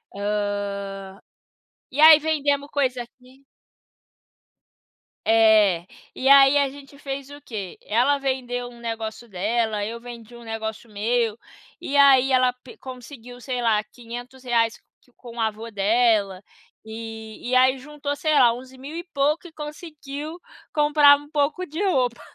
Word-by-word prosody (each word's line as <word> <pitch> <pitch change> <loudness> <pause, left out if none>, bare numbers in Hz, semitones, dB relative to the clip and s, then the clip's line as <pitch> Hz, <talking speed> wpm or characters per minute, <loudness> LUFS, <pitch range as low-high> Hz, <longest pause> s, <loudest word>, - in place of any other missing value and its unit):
Hã, 200 -1 -4 0.7
e 280 +4 -2
aí 315 -1 +10
vendemos 285 -2 0
coisa 255 -4 0
aqui 255 +3 -20 1.8
É, 215 -6 +4 0.3
e 265 +1 0
aí 275 0 +7
a 280 -1 +2
gente 280 0 -14
fez 275 -1 -6
o 290 0 -11
quê? 200 -6 -7
Ela 255 +6 +2
vendeu 245 -2 -3
um 240 -1 -15
negócio 225 0 -5
dela, 215 +2 -1
eu 230 +2 -6
vendi 240 -1 -11
um 235 - -12
negócio 225 0 -6
meu. 225 +1 -1 0.4
E 285 - -2
aí 270 -1 +6
ela 255 -1 +3
pe 250 0 -16
conseguiu, 250 -1 -11
sei 250 -1 -3
lá, 215 -3 +2
R$500 240 -1 -3 0.2
que 250 - -29
com 240 -2 -13
o - - -8
avô 220 +1 -2
dela, 205 -2 +1 0.4
eh, - - -12 0.5
e 255 +1 -2
aí 260 +1 +4
juntou, 290 +1 -5
sei 310 +1 0
lá, 240 -5 +5
11.000 260 +4 -10
e 340 - -5
pouco 295 +5 0
e - - -15
conseguiu 300 0 -8 0.3
comprar 295 -1 +6
um 290 +1 -15
pouco 305 +5 -1
de 320 +5 -6
roupa. 255 -10 0
250 Hz, 140 wpm, -23 LUFS, 225-280 Hz, 1.8 s, aí